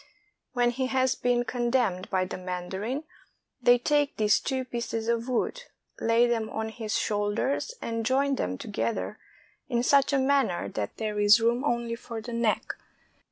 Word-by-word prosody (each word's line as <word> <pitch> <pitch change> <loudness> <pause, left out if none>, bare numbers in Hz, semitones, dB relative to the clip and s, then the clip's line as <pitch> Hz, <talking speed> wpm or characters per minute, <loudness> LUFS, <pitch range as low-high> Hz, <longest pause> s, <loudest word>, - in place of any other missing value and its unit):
When 245 -1 +2
he 260 +1 -1
has 260 0 +2
been 245 -1 +1
condemned 240 -6 0
by 185 -1 +1
the 185 - -6
mandarin, 190 - -4 0.6
they 245 0 +6
take 290 +3 +1
these 210 -2 +4
two 260 -1 -2
pieces 235 -2 -3
of 235 +1 0
wood, - - -1 0.3
lay 230 +1 +4
them 230 -2 0
on 220 0 -3
his 220 -1 -3
shoulders, 210 - -1
and 230 0 -2
join 275 +4 +2
them 95 - -2
together 215 - -3 0.5
in 240 -2 +1
such 280 +2 +4
a 280 - +3
man 275 +1 +3
ner 175 - -3
that 105 -2 -4
there 215 -2 -2
is 205 +2 +7
room 235 +3 +1
only 235 -4 0
for 230 -1 -6
the 235 +2 -7
neck. 230 -2 0
235 Hz, 165 wpm, -27 LUFS, 215-260 Hz, 0.6 s, is